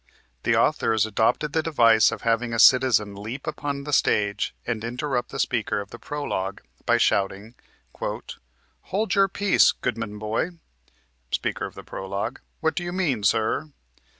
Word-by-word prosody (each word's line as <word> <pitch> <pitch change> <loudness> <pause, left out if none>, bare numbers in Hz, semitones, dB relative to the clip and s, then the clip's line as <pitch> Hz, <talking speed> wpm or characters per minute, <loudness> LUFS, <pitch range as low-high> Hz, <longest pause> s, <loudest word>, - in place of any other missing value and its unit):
The - - +2
authors 110 -2 +2
adopted 115 +8 +1
the 160 - +2
device 115 -9 +4
of - - -6
having 115 0 +1
a - - -1
Citizen 120 -5 +5
leap 110 +7 -7
upon 145 -2 -3
the 145 0 -5
stage 100 -5 +1
and 115 -2 -3
interrupt 125 +2 -2
the - - -7
Speaker 120 -6 0
of 100 -1 -8
the 120 - -9
Prolog 100 -9 -3 0.3
by - - +4
shouting 100 +3 0 0.5
"Hold 125 - -5
your 195 -1 +4
peace, 200 0 +4
goodman 115 -4 -4
boy!" 110 - -2 0.7
Speaker - - -2
of - - -14
Prolog: 100 +6 -5 0.2
"What 160 -1 +1
do 175 - -3
you 175 - -4
mean, 170 - 0
sir?" 110 +8 +1
115 Hz, 150 wpm, -24 LUFS, 105-145 Hz, 0.7 s, Citizen